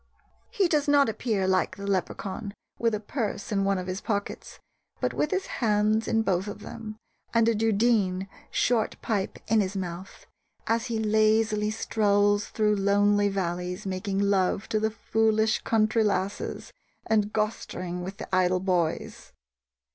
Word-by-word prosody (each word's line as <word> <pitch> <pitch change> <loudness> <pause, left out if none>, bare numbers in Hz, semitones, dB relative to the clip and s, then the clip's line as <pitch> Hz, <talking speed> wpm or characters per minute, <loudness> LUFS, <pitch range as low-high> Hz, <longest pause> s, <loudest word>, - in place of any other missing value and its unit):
He 390 -3 +2
does 300 -3 +1
not 285 -3 +5
appear, 215 -4 -1
like 190 0 +1
the 200 - -7
Leprechaun, 200 +1 -3 0.2
with 230 -2 +2
a - - -3
purse 215 -1 -4
in 195 -1 +1
one 195 0 +1
of 185 - -4
his 185 +1 -4
pockets, 205 -2 -4 0.4
but - - -1
with 300 - 0
his 380 +2 -1 0.2
hands 215 0 +2
in 225 0 +2
both 190 -1 0
of 205 - -7
them, 215 0 -8 0.4
and 230 -1 +4
a 230 - +4
dudeen 210 -3 +1 0.2
(short 230 -3 +1
pipe) 205 -4 -1
in 220 0 +4
his 195 0 -2
mouth, 180 0 -6 0.4
as 230 +2 0
he 230 -2 -2
lazily 215 0 +2
strolls 205 -1 +2
through 210 -1 +1
lonely 205 +1 +3
valleys 180 0 -3
making 195 +1 -3
love 200 0 +1
to 215 - +1
the 220 +1 +1
foolish 220 0 +1
country 220 0 +2
lasses 200 -1 -2 0.3
and 210 -1 +1
"gostering" 185 -5 -3
with 190 +2 -6
the 190 - -3
idle 185 0 +3
"boys." 180 -4 -2
210 Hz, 155 wpm, -27 LUFS, 195-220 Hz, 0.4 s, not